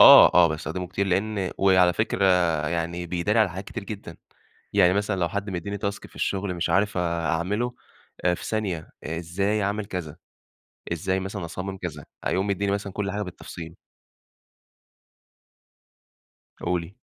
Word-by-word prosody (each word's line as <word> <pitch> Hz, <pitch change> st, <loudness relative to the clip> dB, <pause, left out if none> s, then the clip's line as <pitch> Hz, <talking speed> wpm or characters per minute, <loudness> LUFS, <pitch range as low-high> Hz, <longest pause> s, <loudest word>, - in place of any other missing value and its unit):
آه -, -, +10 dB
آه، 90 Hz, -1 st, +7 dB
باستخدمه 85 Hz, +4 st, -3 dB
كتير 100 Hz, +2 st, -1 dB
لإن 95 Hz, +1 st, 0 dB
وعلى 95 Hz, -2 st, +5 dB
فكرة 110 Hz, -1 st, 0 dB, 0.4 s
يعني 85 Hz, +1 st, -2 dB
بيداري 90 Hz, +6 st, +1 dB
على 110 Hz, -4 st, +4 dB
حاجات 95 Hz, +3 st, -6 dB
كتير 115 Hz, 0 st, -6 dB
جدًا. 100 Hz, -5 st, -7 dB, 0.6 s
يعني 95 Hz, -3 st, +5 dB
مثلًا 100 Hz, 0 st, 0 dB
لو 85 Hz, -1 st, +1 dB
حد 100 Hz, +3 st, -3 dB
مدّيني 95 Hz, +2 st, -3 dB
task 100 Hz, 0 st, -3 dB
في -, -, -22 dB
الشغل 95 Hz, -1 st, -1 dB
مش 85 Hz, -, -1 dB
عارف 100 Hz, 0 st, +2 dB
أعمله 85 Hz, +7 st, 0 dB, 0.5 s
آآ 90 Hz, -, +5 dB
في -, -, -6 dB
ثانية، 95 Hz, -7 st, -2 dB
إزاي 90 Hz, +6 st, -1 dB
اعمِل 100 Hz, +1 st, -1 dB
كذا، 85 Hz, -5 st, -5 dB, 0.8 s
إزاي 95 Hz, +3 st, 0 dB
مثلًا 95 Hz, -1 st, -4 dB
أصمم 95 Hz, +3 st, -5 dB
كذا، 75 Hz, -5 st, -6 dB, 0.2 s
هيقوم 95 Hz, +2 st, +1 dB
مدّيني 100 Hz, 0 st, 0 dB
مثلًا 100 Hz, -1 st, -2 dB
كل 100 Hz, -1 st, -2 dB
حاجة 105 Hz, +1 st, -2 dB
بالتفصيل. 85 Hz, -3 st, -8 dB, 2.8 s
قولِي. 85 Hz, +1 st, -2 dB
95 Hz, 145 wpm, -25 LUFS, 85-100 Hz, 2.8 s, آه